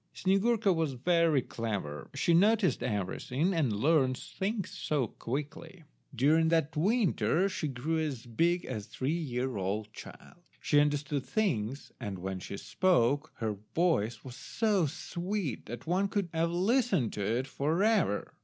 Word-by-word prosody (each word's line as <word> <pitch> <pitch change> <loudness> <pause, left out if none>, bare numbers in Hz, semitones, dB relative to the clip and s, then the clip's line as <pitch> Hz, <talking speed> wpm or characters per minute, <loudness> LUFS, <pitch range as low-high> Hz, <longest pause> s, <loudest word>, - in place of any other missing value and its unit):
Snyegurka 200 +2 +2
was 160 -4 0
very 165 +1 +2
clever; 100 -14 -4
she 170 +5 +2
noticed 205 +2 +3
everything, 125 - -1
and 155 -8 +1
learnt 130 +3 +2
things 200 - -4 0.3
quickly. 150 +7 -5 0.3
During 155 +6 +4
that 160 -1 +1
winter 190 -1 +2
she 185 -5 -3
grew 145 +5 -2
as 140 -6 -3
big 170 +9 +1
as 110 -5 -5
a - - -28
three 130 +7 -2
year 130 -7 -2
old 105 +3 -3
child. 175 - -12 0.2
She 145 - +3
understood 145 -1 0
things, 140 - -1
and 105 -6 -5
when 95 +1 -4
she 100 +2 -7
spoke 150 - +1
her 110 -3 -3 0.2
voice 120 - +1
was 125 -2 -9
so 205 - 0
sweet 175 - -4
that 120 +3 -7
one 185 +4 +1
could 195 -2 -2
have 165 +1 +1
listened 190 - +1
to 105 - -4
it 115 +6 0
for 155 +7 0
ever. 210 - +1
155 Hz, 145 wpm, -30 LUFS, 120-180 Hz, 0.3 s, During